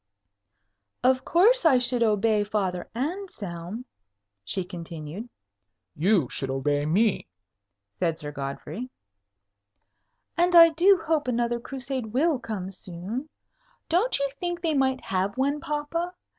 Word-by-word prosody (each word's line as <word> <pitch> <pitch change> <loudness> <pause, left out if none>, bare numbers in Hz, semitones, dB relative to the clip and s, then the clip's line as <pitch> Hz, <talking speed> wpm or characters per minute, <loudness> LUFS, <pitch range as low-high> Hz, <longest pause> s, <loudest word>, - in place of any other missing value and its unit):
"Of 255 +1 +3
course 440 +9 +4
I 305 -6 +6
should 245 0 0
obey 215 -1 +3
Father 195 -4 -2
Anselm," 230 - -5 0.6
she 180 - -2
continued. 170 +3 -7 0.7
"You 175 - +3
should 135 0 -5
obey 145 +2 0
me," 200 - +2 0.7
said 165 -3 +1
Sir 150 -2 -6
Godfrey. 145 - -5 1.5
"And 350 +1 +3
I 335 -1 +10
do 345 +2 +4
hope 310 -4 +1
another 240 -1 0
Crusade 260 -3 -5
will 295 +1 +2
come 200 -6 -5
soon. 195 - -6 0.6
Don't 380 +9 +2
you 280 - 0
think 350 -1 -2
they 330 -2 +1
might 265 -2 +1
have 195 +4 -1
one, 280 +3 +1
papa? 335 +3 -3
235 Hz, 120 wpm, -26 LUFS, 180-300 Hz, 1.5 s, I